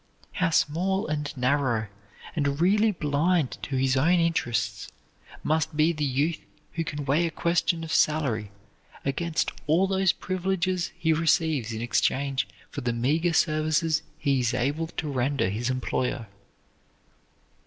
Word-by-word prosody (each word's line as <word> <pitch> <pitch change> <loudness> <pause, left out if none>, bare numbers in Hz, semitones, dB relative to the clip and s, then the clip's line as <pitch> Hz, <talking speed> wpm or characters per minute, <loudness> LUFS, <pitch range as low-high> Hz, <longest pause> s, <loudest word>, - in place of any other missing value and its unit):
How 185 -1 0
small 180 +5 +1
and 150 -1 -2
narrow 125 -3 +1 0.5
and 140 -2 0
really 210 +5 +4
blind 155 -2 0
to 140 - -4
his 130 0 +2
own 170 +7 +3
interests 115 -12 0 0.6
must 155 0 0
be 160 +2 +4
the 150 -2 -3
youth 145 +4 0 0.3
who 165 - -1
can 145 -2 -5
weigh 150 +5 +2
a - - -2
question 170 0 0
of 160 - -4
salary 130 -9 +1 0.6
against 155 +4 -1 0.2
all 165 +5 +4
those 190 -1 +2
privileges 185 -1 -1
he 160 -2 +2
receives 155 - +1
in 110 0 -4
exchange 130 +1 0 0.2
for - - -5
the 120 -1 -1
meager 150 +9 +1
services 155 0 +2 0.2
he 140 -3 +1
is 120 -1 0
able 145 +6 -1
to 160 -1 -5
render 135 -5 0
his 120 +5 -2
employer. 130 -2 -1
150 Hz, 140 wpm, -26 LUFS, 130-165 Hz, 0.6 s, really